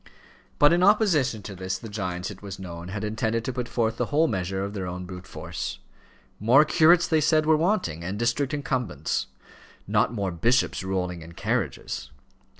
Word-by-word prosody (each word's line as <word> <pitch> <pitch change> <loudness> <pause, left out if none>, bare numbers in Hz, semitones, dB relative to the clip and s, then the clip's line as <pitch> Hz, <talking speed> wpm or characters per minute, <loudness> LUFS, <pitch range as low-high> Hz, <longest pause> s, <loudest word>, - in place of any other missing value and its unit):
But, 145 +3 +6
in 175 - +3
opposition 180 - +3
to 100 - -7
this, 95 +1 -3
the 115 - -9
giants, 90 -3 -4
it 95 - -11
was 100 -2 -7
known, 85 -2 -8
had 105 +3 -5
intended 110 +1 -1
to 130 - -2
put 125 -1 -4
forth 115 -1 0
the - - 0
whole 155 +3 +3
measure 95 - -2
of 100 - -6
their 95 -3 -4
brute 90 0 -8
force. - - -5 0.6
More 125 +8 +6
curates, 170 +3 +5
they 160 -2 +2
said, 155 0 +3
were 155 0 +5
wanting, 155 - 0
and 95 +4 -3
district 120 +4 0
incumbents; 125 - -2 0.6
not - - +2
more 100 -5 -2
bishops 115 +6 +1
rolling 90 -2 -2
in 80 +1 -11
carriages. - - -2
110 Hz, 175 wpm, -26 LUFS, 95-145 Hz, 0.6 s, But